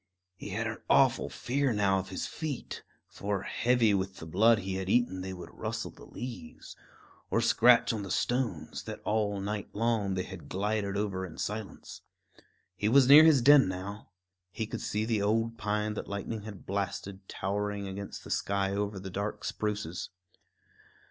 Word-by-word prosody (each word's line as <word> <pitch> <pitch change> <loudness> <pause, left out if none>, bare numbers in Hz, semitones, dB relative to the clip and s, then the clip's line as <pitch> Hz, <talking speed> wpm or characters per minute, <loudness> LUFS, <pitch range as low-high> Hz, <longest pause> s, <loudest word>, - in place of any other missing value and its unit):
He 90 - -8
had 110 +4 -2
an 110 0 -4
awful 130 -2 +4
fear 135 +1 0
now 100 -2 +2
of 95 - -6
his 95 - -3
feet; 150 -6 -5 0.3
for, 100 -1 -3
heavy 120 -2 +2
with 95 -1 -1
the 80 - -8
blood 110 +8 +4
he 95 -1 -4
had 95 0 -4
eaten, 120 -5 +2
they 95 +1 -5
would 90 -2 -9
rustle - - -4
the - - -15
leaves, 120 -10 -8 0.5
or - - +2
scratch 120 -1 +5
on 110 - -3
the 100 - -6
stones, 115 - -1
that - - -6
all 105 -2 0
night 100 +1 -3
long 110 -3 0
they 90 - -1
had - - -10
glided 100 0 -1
over 100 -2 -1
in 85 -3 -8
silence. 105 -1 -5 0.7
He 105 +3 0
was 135 +1 +6
near 145 +3 +10
his 155 -6 +6
den 145 -3 +8
now. 95 +3 -6 0.4
He 110 +5 -3
could - - -5
see 105 +1 -1
the 110 -3 0
old 115 +3 0
pine 105 +1 -1
that - - -5
lightning 100 +2 -4
had 105 -2 -10
blasted, 100 0 -4
towering 100 +1 -2
against 100 +1 -6
the - - -9
sky 100 -1 0
over 100 0 -2
the 95 0 -7
dark 100 +3 -3
spruces. 105 -5 -3
105 Hz, 175 wpm, -30 LUFS, 95-115 Hz, 0.7 s, near